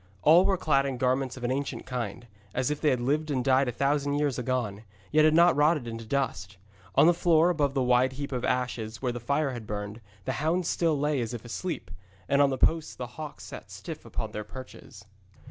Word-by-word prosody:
All 170 +5 +7
were 195 - +2
clad 140 -5 +2
in 135 -2 -3
garments 130 +1 0
of 125 - -9
an 120 - 0
ancient 140 +1 -3
kind, 120 -2 -4 0.3
as 130 +3 0
if 150 - -3
they 155 - +3
had 130 -3 +1
lived 150 +5 0
and 130 -3 -1
died 135 0 +4
a - - 0
thousand 140 +3 0
years 145 -4 0
agone, 120 -5 -2 0.3
yet 155 0 +5
had 155 0 +4
not 170 +1 +6
rotted 150 -3 +2
into 115 0 -6
dust. 120 -8 -2 0.4
On - - +6
the 175 - +6
floor, 170 0 +4
about 145 -4 0
the 135 - +2
wide 125 +1 +3
heap 140 +1 -5
of 125 -2 -3
ashes 115 -3 -2
where 125 - +1
the 120 - -5
fire 140 +4 0
had 120 -4 -7
burned, 105 +2 -5 0.2
the - - -1
hounds 170 +3 +1
still 165 -3 +1
lay 145 -2 +1
as 115 +1 -3
if 120 - -9
asleep, 155 +6 -5 0.4
and 140 +1 +3
on 140 - +5
the 135 - -2
posts 160 +3 +1
the 125 - -5
hawks 150 +5 -9
sat - - -9
stiff - - -8
upon - - -5
their 105 - -5
perches. 105 -2 -11
135 Hz, 225 wpm, -28 LUFS, 120-150 Hz, 0.4 s, All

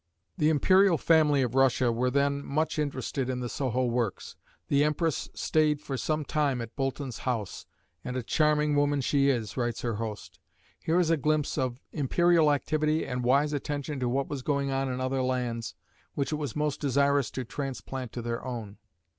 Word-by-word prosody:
The 155 -4 +2
imperial 185 +4 +4
family 150 -5 +4
of 125 -2 -2
Russia 130 -2 +3
were 125 +2 0
then 140 +1 +1
much 155 +3 -1
interested 135 -2 -2
in 125 -1 -2
the 125 - -3
Soho 130 0 -1
works. 120 -4 -2 0.3
The 140 0 +3
empress 150 +1 0
stayed 155 -2 +2
for 140 -2 -5
some 155 +3 -1
time 145 -4 0
at 115 -1 -7
Boulton's 135 -5 -3
house, 115 -7 -3 0.4
"and 125 0 -4
a 125 - -2
charming 150 +2 +2
woman 145 0 +2
she 140 +1 +2
is," 115 -7 -1
writes 120 -2 -1
her 115 -3 -1
host. 110 -2 -6 0.4
Here 165 +2 +1
is 170 -2 +2
a 165 - +3
glimpse 150 +1 0
of 130 -3 -2
imperial 165 +2 +3
activity 155 +2 0
and 125 -1 -3
wise 140 +4 +3
attention 145 0 -3
to 125 -1 0
what 135 +2 0
was 140 -2 -4
going 140 0 0
on 135 0 -1
in 125 - -3
other 130 +1 -1
lands 120 -5 -2 0.4
which 140 +1 -1
it 155 - 0
was 145 -6 -4
most 150 -1 -1
desirous 140 -1 +2
to 130 - -4
transplant 135 -1 -5
to 120 - -5
their 115 0 -3
own. 115 -5 -6
140 Hz, 185 wpm, -28 LUFS, 125-150 Hz, 0.4 s, imperial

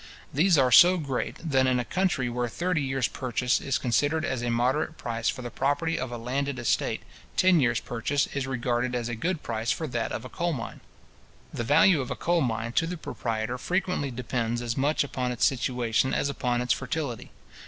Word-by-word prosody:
These 170 +4 +4
are 130 -2 +4
so 180 +8 +8
great, 140 -6 -3
that 135 -3 +3
in 125 -1 +2
a 120 - -2
country 180 -6 0
where 120 0 -1
thirty 175 +5 -1
years 135 -3 0
purchase 125 0 -1
is 135 0 0
considered 145 +5 +1
as 130 -2 -2
a 120 - -1
moderate 130 +7 0
price 115 -1 -2
for 125 - -4
the 120 - -6
property 145 +5 0
of 130 -1 -4
a 120 - -4
landed 135 +3 -2
estate, 120 -2 0 0.3
ten 185 -2 +5
years 120 -4 +2
purchase 125 +4 -1
is 140 -2 -2
regarded 125 -1 -1
as 120 -1 -2
a 120 - -3
good 165 +7 -2
price 115 0 -3
for 160 - 0
that 120 -5 -2
of 120 - -4
a - - -5
coal 170 +6 -2
mine. 115 -5 -6 0.7
The 120 - -2
value 155 +5 +5
of 130 - -5
a - - -2
coal 175 0 +1
mine 115 -3 -1
to 165 +7 +1
the 180 +1 -4
proprietor, 115 -4 -3
frequently 180 -3 -1
depends 120 -1 -2
as 115 -1 -2
much 145 +3 +1
upon 130 -3 -3
its 120 - +1
situation 125 -1 +1
as 140 - 0
upon 125 -3 -1
its 125 - +2
fertility. 130 -3 -4
130 Hz, 205 wpm, -27 LUFS, 120-145 Hz, 0.7 s, so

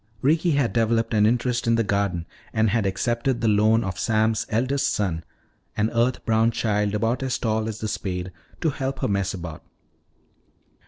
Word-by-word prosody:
Ricky 160 +4 +3
had 140 -4 +1
developed 115 0 +1
an 105 -1 +4
interest 120 +1 0
in 115 - +4
the 115 - +2
garden 100 -4 -1 0.3
and 110 -1 +2
had 110 -2 +1
accepted 120 +6 0
the 115 - 0
loan 110 +2 +4
of 95 -3 -4
Sam's 110 +1 +1
eldest 130 +6 +1
son, 85 -6 -1 0.5
an 110 +1 +1
earth 120 +2 +1
brown 110 0 +3
child 105 -2 0
about 115 +4 0
as 130 -1 -1
tall 110 -2 -1
as 110 0 -6
the 110 - -1
spade, 90 -3 -3 0.3
to 160 -3 +2
help 135 0 -4
her - - +1
mess 100 -1 -1
about. 85 -3 -7
110 Hz, 175 wpm, -24 LUFS, 105-120 Hz, 0.5 s, an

